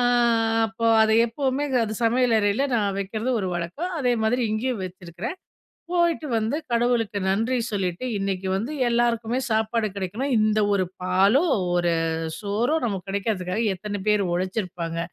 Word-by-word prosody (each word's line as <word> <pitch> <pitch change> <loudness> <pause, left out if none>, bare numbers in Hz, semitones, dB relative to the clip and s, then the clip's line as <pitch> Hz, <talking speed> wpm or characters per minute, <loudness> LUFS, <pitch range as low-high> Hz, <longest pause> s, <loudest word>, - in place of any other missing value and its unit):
ஆ - - +2 0.7
அப்போ 225 +2 -2 0.2
அத 220 - +3 0.2
எப்பவுமே 270 +4 -1 0.2
அது 215 - -4
சமையலறைல 230 0 +2
நான் 200 -3 0
வைக்கிறது 215 +5 -3
ஒரு 190 - -2
வழக்கம். 280 - -4
அதே 245 -2 +2
மாதிரி 245 +3 +1
இங்கேயும் 230 -1 -1
வச்சுருக்றேன். 180 - -7 0.6
போயிட்டு 340 -3 +1
வந்து 225 +6 0
கடவுளுக்கு 235 -3 +1
நன்றி 225 +6 +1
சொல்லிட்டு, 190 0 -2
இன்னிக்கு 195 -1 -2
வந்து 230 +9 -3 0.2
எல்லாருக்குமே 235 0 +1
சாப்பாடு 220 0 +1
கிடைக்கணும். 215 +9 -2
இந்த 215 0 +2
ஒரு 195 - +2 0.2
பாலோ, 190 - +3 0.3
ஒரு 175 -1 +2 0.5
சோறோ 220 +8 0
நமக்கு 195 -5 -3
கிடைக்குறதுக்காக 200 0 -1
எத்தன 205 +2 -5
பேர் 210 -1 +4
ஒழச்சிருப்பாங்க. 180 -3 -3
215 Hz, 135 wpm, -24 LUFS, 190-240 Hz, 0.7 s, பேர்